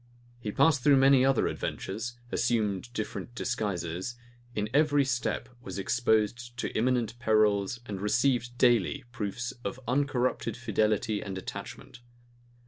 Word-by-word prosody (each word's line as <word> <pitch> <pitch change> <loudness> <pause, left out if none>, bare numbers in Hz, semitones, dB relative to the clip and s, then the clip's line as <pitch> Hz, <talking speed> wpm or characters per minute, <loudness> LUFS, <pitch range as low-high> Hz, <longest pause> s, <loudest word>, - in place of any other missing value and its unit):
He 110 -3 -4
passed 150 +3 +4
through 140 -1 +6
many 135 -1 +6
other 135 -1 +3
adventures; 115 +5 -4
assumed 110 -1 0
different 120 +1 -5
disguises; 95 -1 -2 0.4
in 105 0 0
every 145 -1 +4
step 125 -2 -1
was 95 -6 -7
exposed 120 +3 0
to - - -3
imminent 120 -1 +1
perils 110 -1 +2
and 100 -4 -5
received 120 +3 +1
daily 125 +3 +3
proofs 120 +1 -3
of 125 - -4
uncorrupted 125 -3 0
fidelity 110 -2 0
and 95 -2 -5
attachment. 120 +5 -8
120 Hz, 125 wpm, -29 LUFS, 105-125 Hz, 0.4 s, through